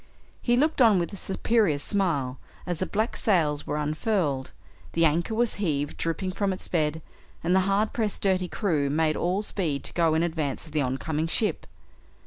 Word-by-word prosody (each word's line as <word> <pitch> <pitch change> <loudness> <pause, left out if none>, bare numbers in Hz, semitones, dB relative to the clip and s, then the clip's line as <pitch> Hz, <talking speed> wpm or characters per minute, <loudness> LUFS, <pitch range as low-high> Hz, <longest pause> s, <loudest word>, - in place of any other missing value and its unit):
He 240 0 +2
looked 300 +1 +2
on 225 -5 +6
with 175 +2 -1
a - - -4
superior 195 -3 +1
smile 145 -7 -1 0.3
as 175 -3 -3
the 185 - -1
black 220 +3 -1
sails 155 -8 +1
were 150 - -1
unfurled, 150 -2 -1 0.4
the 165 0 +3
anchor 170 +8 +1
was 235 0 +1
heaved 145 -6 -1
dripping 185 +3 -2
from 195 +1 0
its 185 - -5
bed, 155 -2 0 0.4
and 175 +2 +2
the - - +6
hard 205 +2 +1
pressed 220 -4 -2
dirty 185 -2 +2
crew 160 -9 0
made 155 +1 +1
all 185 +4 0
speed 160 -9 -2
to - - -5
go 165 -2 +2
in 160 - +2
advance 160 -5 -2
of 155 - -13
the 150 -1 +1
oncoming 150 +5 -1
ship. 190 +1 0
170 Hz, 185 wpm, -26 LUFS, 150-200 Hz, 0.4 s, on